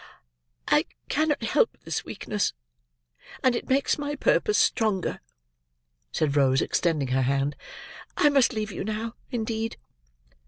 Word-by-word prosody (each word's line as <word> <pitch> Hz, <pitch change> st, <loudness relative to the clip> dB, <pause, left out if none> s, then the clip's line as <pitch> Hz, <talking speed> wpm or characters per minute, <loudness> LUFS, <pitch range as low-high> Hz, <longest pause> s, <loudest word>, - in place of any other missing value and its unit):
"I -, -, +4 dB, 0.2 s
cannot 305 Hz, -1 st, +1 dB
help -, -, +2 dB
this -, -, -3 dB
weakness, 210 Hz, -1 st, -2 dB, 0.9 s
and 255 Hz, -2 st, +4 dB
it -, -, -4 dB
makes 270 Hz, +3 st, +2 dB
my 290 Hz, 0 st, -2 dB
purpose 420 Hz, +8 st, +2 dB
stronger," 215 Hz, -5 st, +1 dB, 0.9 s
said 145 Hz, -, 0 dB
Rose, 135 Hz, -2 st, +4 dB
extending 155 Hz, -6 st, 0 dB
her 130 Hz, +1 st, +2 dB
hand. 140 Hz, +2 st, +1 dB, 0.6 s
"I 295 Hz, -, +5 dB
must 275 Hz, -3 st, +4 dB
leave 215 Hz, -2 st, -3 dB
you -, -, -4 dB
now, 220 Hz, +2 st, -3 dB, 0.2 s
indeed." 225 Hz, -2 st, -2 dB
220 Hz, 125 wpm, -26 LUFS, -, 0.9 s, I